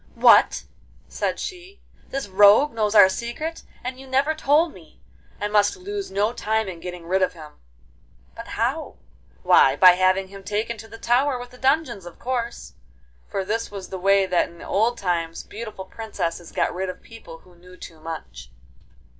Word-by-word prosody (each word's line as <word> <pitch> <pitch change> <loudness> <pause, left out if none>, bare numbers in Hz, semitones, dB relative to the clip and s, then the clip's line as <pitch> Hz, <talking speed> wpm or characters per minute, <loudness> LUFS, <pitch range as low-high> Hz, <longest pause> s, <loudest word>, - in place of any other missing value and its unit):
'What!' - - +5 0.4
said - - -2
she, 370 +2 -8 0.3
'this 275 -4 -4
rogue 205 +9 +6
knows 215 -1 0
our 205 -2 +9
secret, 240 +11 -4 0.2
and 255 +1 -5
you 270 - -11
never 270 +4 +1
told 315 +2 +2
me! 165 -4 -17 0.4
I 205 - -1
must 205 0 +2
lose 400 +2 -5
no 205 +4 0
time 220 -2 -1
in 180 -3 -7
getting 180 -1 -8
rid 190 +3 +1
of 185 - +1
him.' 155 -3 -13 0.8
'But - - -9
how?' - - -2 0.5
'Why, 135 0 +5
by 185 +4 +8
having 185 +1 +2
him 195 0 -11
taken 215 +4 -2
to 225 - -10
the 225 - -11
tower 250 +4 +1
with 245 0 -9
the 250 - -16
dungeons, 265 - 0
of 175 - -12
course.' 240 -2 -4 0.6
For 195 - -3
this 225 +3 -2
was 195 -2 -8
the 190 - -6
way 195 +1 +4
that 180 -2 +1
in 170 0 -14
old 230 +4 +1
times 170 -4 -2
beautiful 215 -3 -8
princesses 180 -5 -5
got - - 0
rid 185 +1 -3
of 185 - -8
people 225 -8 -12
who 180 +2 -21
knew 180 +1 -16
too 165 -3 -11
much. 65 - -8
205 Hz, 180 wpm, -23 LUFS, 180-245 Hz, 0.8 s, our